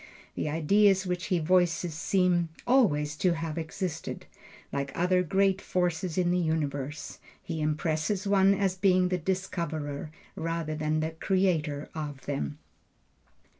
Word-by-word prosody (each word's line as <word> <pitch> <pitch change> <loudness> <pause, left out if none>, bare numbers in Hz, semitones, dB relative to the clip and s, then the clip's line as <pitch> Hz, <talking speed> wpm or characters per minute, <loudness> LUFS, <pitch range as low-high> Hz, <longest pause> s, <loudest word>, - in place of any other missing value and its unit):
The - - -2
ideas 190 +5 +3
which 180 0 -2
he 185 - +2
voices 175 0 +2
seem 175 +1 +1 0.2
always 150 - +3
to 180 +2 +2
have 165 -1 -3
existed, 160 0 -4 0.5
like 140 -1 -2
other 180 +1 +3
great 195 +2 +2
forces 180 -1 -1
in 175 -1 +2
the 180 - +2
universe; 150 -3 -2 0.2
he 160 - -5
impresses 155 +6 0
one 195 0 +4
as 195 -2 +1
being 185 -1 +3
the 180 -1 0
discoverer, 160 -5 -3 0.3
rather 165 -1 -2
than 155 0 0
the 160 +1 -1
creator 160 -4 0
of 145 -3 -6
them. 145 +1 -3
170 Hz, 130 wpm, -28 LUFS, 155-185 Hz, 0.5 s, one